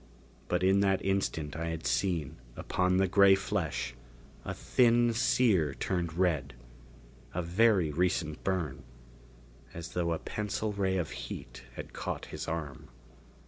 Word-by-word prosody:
But -, -, 0 dB
in 95 Hz, +1 st, +4 dB
that 95 Hz, -1 st, +2 dB
instant 80 Hz, -6 st, -1 dB
I 85 Hz, +1 st, -3 dB
had 80 Hz, -1 st, -4 dB
seen, 85 Hz, -8 st, 0 dB, 0.2 s
upon 90 Hz, 0 st, +1 dB
the 95 Hz, 0 st, +3 dB
gray 100 Hz, +1 st, +6 dB
flesh, 80 Hz, -9 st, -2 dB, 0.5 s
a -, -, -4 dB
thin 120 Hz, -1 st, +3 dB
sear 105 Hz, -, +2 dB
turned 85 Hz, -4 st, -2 dB
red. 80 Hz, -7 st, 0 dB, 0.8 s
A 90 Hz, -, -1 dB
very 90 Hz, -2 st, +3 dB
recent 80 Hz, -1 st, 0 dB
burn 80 Hz, -8 st, -1 dB, 0.9 s
as 85 Hz, 0 st, -6 dB
though 85 Hz, -1 st, -1 dB
a 80 Hz, -, 0 dB
pencil 105 Hz, +3 st, -3 dB
ray 95 Hz, -2 st, 0 dB
of 85 Hz, -4 st, -2 dB
heat -, -, -8 dB
had -, -, -8 dB
caught -, -, -4 dB
his -, -, -5 dB
arm. 75 Hz, -6 st, -5 dB
90 Hz, 140 wpm, -30 LUFS, 80-100 Hz, 0.9 s, gray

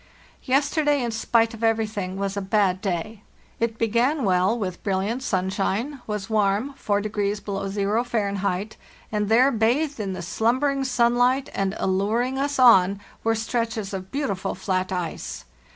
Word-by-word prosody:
Yesterday, 290 Hz, +1 st, +2 dB
in 235 Hz, -, -1 dB
spite 225 Hz, +1 st, +2 dB
of 225 Hz, 0 st, -8 dB
everything, 215 Hz, -4 st, 0 dB
was 200 Hz, 0 st, -2 dB
a 200 Hz, -, -2 dB
bad 190 Hz, -2 st, +1 dB
day. 195 Hz, +2 st, -3 dB, 0.4 s
It 230 Hz, -1 st, -1 dB
be 230 Hz, -, +2 dB
gan 250 Hz, +6 st, +1 dB
well, 190 Hz, +3 st, +2 dB
with 185 Hz, -5 st, -4 dB
brilliant 200 Hz, +5 st, -1 dB
sunshine; 200 Hz, +5 st, -1 dB
was 210 Hz, -2 st, -3 dB
warm 215 Hz, +4 st, +1 dB
(4° 205 Hz, -3 st, -1 dB
below 195 Hz, -1 st, -3 dB
zero 205 Hz, +3 st, 0 dB
Fahr.), 200 Hz, -5 st, -1 dB, 0.5 s
and 210 Hz, -1 st, -1 dB
there, 250 Hz, +5 st, +5 dB
bathed 255 Hz, +6 st, +1 dB
in 195 Hz, -3 st, -2 dB
the 185 Hz, -1 st, -6 dB
slumbering 260 Hz, +9 st, +1 dB
sun 240 Hz, -2 st, +2 dB
light 255 Hz, +2 st, +2 dB
and 195 Hz, +1 st, -1 dB
alluring 220 Hz, +8 st, 0 dB
us 285 Hz, +1 st, -1 dB
on, 200 Hz, -6 st, +6 dB, 0.2 s
were 225 Hz, 0 st, +2 dB
stretches 225 Hz, -2 st, -2 dB
of 190 Hz, -1 st, -5 dB
beautiful 245 Hz, -10 st, -2 dB
flat 185 Hz, 0 st, -1 dB
ice. 175 Hz, -, -4 dB
215 Hz, 150 wpm, -24 LUFS, 195-240 Hz, 0.5 s, on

